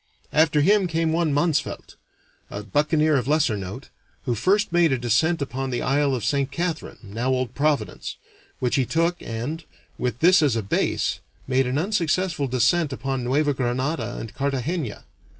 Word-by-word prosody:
After 150 -1 +4
him 195 +4 +4
came 165 -1 0
one 165 -2 +1
Mansvelt, 150 +1 -1 0.5
a 105 - -6
buccaneer 150 - +2
of 125 -2 -2
lesser 150 -6 +2
note, 100 +7 -7 0.3
who 125 - 0
first 195 - +1
made 170 -3 +4
a 130 - +2
descent 135 +7 +1
upon 135 0 -4
the 120 -2 -2
isle 140 +1 +2
of 120 - -3
Saint 140 -1 +1
Catharine, 165 +2 -3
now 115 +5 -3
Old 130 -2 0
Providence, 140 -9 -1 0.4
which 125 +1 0
he 130 - +2
took, 170 +2 0
and, 125 +9 -4 0.4
with 120 -2 -1
this 175 +4 +5
as 145 -6 +2
a 115 - -1
base, 95 - 0 0.3
made 130 0 +1
an 130 +2 -1
unsuccessful 175 -3 0
descent 130 +6 +2
upon 130 0 -3
Neuva 145 +4 +1
Granada 130 +4 -2
and 110 - -7
Cartagena. 140 - -2
140 Hz, 165 wpm, -24 LUFS, 125-160 Hz, 0.5 s, this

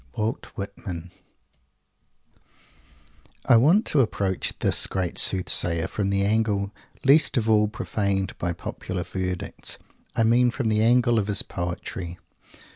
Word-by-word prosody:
WALT 110 0 -2
WHITMAN 95 -3 -6 2.4
I - - +7
want 160 - +5
to 145 - +3
approach 100 -5 -1
this - - +1
great 95 -3 -1
Soothsayer 85 -2 +2
from 100 -2 -2
the 100 0 +1
angle 105 -1 +1 0.3
least 140 +1 +4
of 115 -2 0
all 105 -1 +4
profaned 100 -2 -2
by 90 - -1
popular 90 +1 -5
verdicts. 90 0 -3 0.4
I 115 - +2
mean 120 +2 +4
from 120 -1 -2
the 110 0 +2
angle 120 0 +4
of 105 - -2
his 100 -2 +1
poetry. 90 0 -5
100 Hz, 125 wpm, -24 LUFS, 95-115 Hz, 2.4 s, I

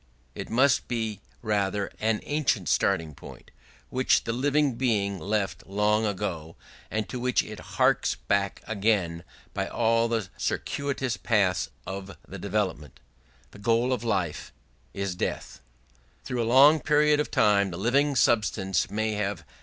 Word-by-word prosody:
It - - -7
must 130 +3 +3
be 110 -4 -3 0.2
rather 100 -1 0
an 110 0 0
ancient 140 - 0
starting 80 -2 +1
point, - - -13 0.4
which 130 +1 +2
the 115 - -2
living 145 +2 +2
being 105 -6 0
left 100 +3 -2
long 105 +2 +1
ago, 90 -6 -4 0.3
and 110 -2 -2
to 125 - -5
which 125 0 +1
it - - -9 0.2
harks - - +3
back 100 0 -1
again 100 -6 0 0.3
by - - -2
all 115 0 +2
the 115 -4 -1
circuitous 135 -3 -2
paths 100 -6 +1 0.2
of 95 +1 -7
development.... 95 -6 -3 0.5
The - - -14
goal 115 +4 +2
of 120 - -3
all 115 - -2
life 90 -7 -2 0.4
is 100 -1 -3
death.... 90 - -4 0.6
"Through 125 -1 -2
a 115 - -1
long 145 +5 +7
period 150 0 +3
of 150 - -1
time 100 -2 +3
the 85 - -6
living 140 +8 +2
substance 95 -7 +2
may 110 +1 -1
have 100 -5 -3
105 Hz, 145 wpm, -27 LUFS, 100-120 Hz, 0.6 s, long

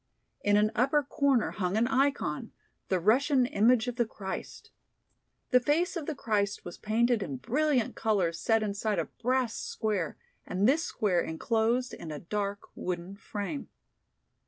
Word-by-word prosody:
In 205 0 +4
an 210 +1 +3
upper 275 +6 +2
corner 275 -3 +1
hung 185 0 -1
an 225 - +3
ikon, 270 - 0 0.4
the 185 - +2
Russian 255 - +3
image 240 +1 +3
of 245 0 -3
the 240 - +3
Christ. 190 -3 -7 0.8
The 250 - +7
face 320 +9 +1
of 320 -4 -4
the 315 - -2
Christ 205 -5 -1
was 175 - -8
painted 230 +1 +2
in 140 -8 -4
brilliant 260 - +1
colors 190 -7 +1
set 225 -1 +2
inside 210 0 -1
a - - 0
brass 250 -1 -1
square 205 -7 -2 0.3
and 190 +4 +1
this 305 +6 +3
square 190 - +1
enclosed 230 +8 0
in 160 - -7
a 150 - -4
dark 200 +5 -3
wooden 180 +1 -4
frame. 205 +6 -5
220 Hz, 155 wpm, -29 LUFS, 200-255 Hz, 0.8 s, The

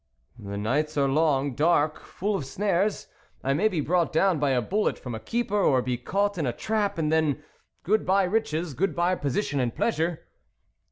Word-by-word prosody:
" 120 - -26
The 100 - -4
nights 145 +9 -1
are 140 -1 +3
long, 140 -1 +2
dark, 155 +2 +2
full 205 +2 -3
of 145 -9 -3
snares; 200 +3 0 0.4
I 135 - +1
may 180 +10 +3
be 175 -8 -1
brought 170 +3 +1
down 175 0 +2
by 145 -1 +1
a 130 -2 +2
bullet 205 - 0
from 125 - -7
a 110 - -4
keeper, 220 - -1
or 130 -8 +3
be 125 -1 -1
caught 200 +10 -1
in 150 - 0
a 120 - -1
trap, 210 - -1
and 155 -2 0
then 155 -2 +1 0.4
good 215 +4 +2
bye 195 +2 +3
riches, 180 -5 -1
good 170 +5 -1
bye 175 +2 +2
position 145 -1 -1
and 120 -3 -1
pleasure." 170 -7 -1
160 Hz, 200 wpm, -26 LUFS, 140-195 Hz, 0.4 s, are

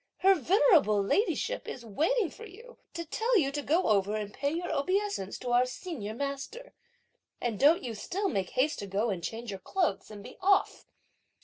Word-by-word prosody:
her 385 +1 +7
venerable 335 - +4
ladyship 420 - 0
is 240 - -7
waiting 330 - 0
for 450 - -11
you 460 +6 -14
to 335 0 -5
tell 450 +8 +1
you 275 -7 +2
to 290 +1 -3
go 325 +6 +2
over 205 0 +2
and 210 -1 -4
pay 280 +1 -1
your 345 +3 -3
obeisance 370 - -1
to 245 - -5
our 245 +1 +5
Senior 250 - -6
master, 280 - -5 0.7
and 230 -4 -2
don't 310 +6 +5
you 240 -3 -4
still 375 - -2
make 195 - -1
haste 290 +4 0
to 200 - -5
go 205 +4 0
and 175 -3 -4
change 230 +3 -5
your 195 - -6
clothes 355 - -1
and 205 -2 -10
be - - -11
off!" 390 +1 +2
280 Hz, 190 wpm, -29 LUFS, -, 0.7 s, her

